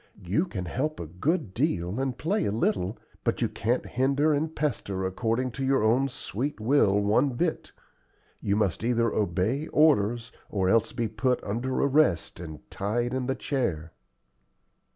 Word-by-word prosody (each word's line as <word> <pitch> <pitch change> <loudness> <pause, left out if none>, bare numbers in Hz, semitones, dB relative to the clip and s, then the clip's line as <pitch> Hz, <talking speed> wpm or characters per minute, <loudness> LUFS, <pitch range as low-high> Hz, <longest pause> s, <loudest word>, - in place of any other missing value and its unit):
You 105 - +1
can 95 - -4
help 145 - -2
a 85 - -4
good 110 - -1
deal, 100 - 0
and 135 -2 -1
play 190 +8 0
a - - 0
little, 100 -2 0 0.3
but - - 0
you - - +2
can't 120 +4 -1
hinder 140 +4 +2
and 155 +2 -1
pester 100 -10 -2
according 115 +6 -1
to 135 - -5
your 135 -3 +2
own 125 +5 +3
sweet 125 +2 -4
will 110 -4 +3
one 110 +7 +2
bit. 165 +5 -1 0.7
You 100 - 0
must 105 -2 0
either 115 -1 +2
obey 105 - 0
orders 120 -7 +3 0.2
or 95 -3 0
else 115 +2 +3
be 115 - -1
put 125 +4 0
under 120 +6 -2
arrest 140 - +2
and 80 -3 -9
tied 120 +5 -1
in 130 -1 -1
the 135 - 0
chair." 85 - -2
120 Hz, 160 wpm, -27 LUFS, 100-135 Hz, 0.7 s, own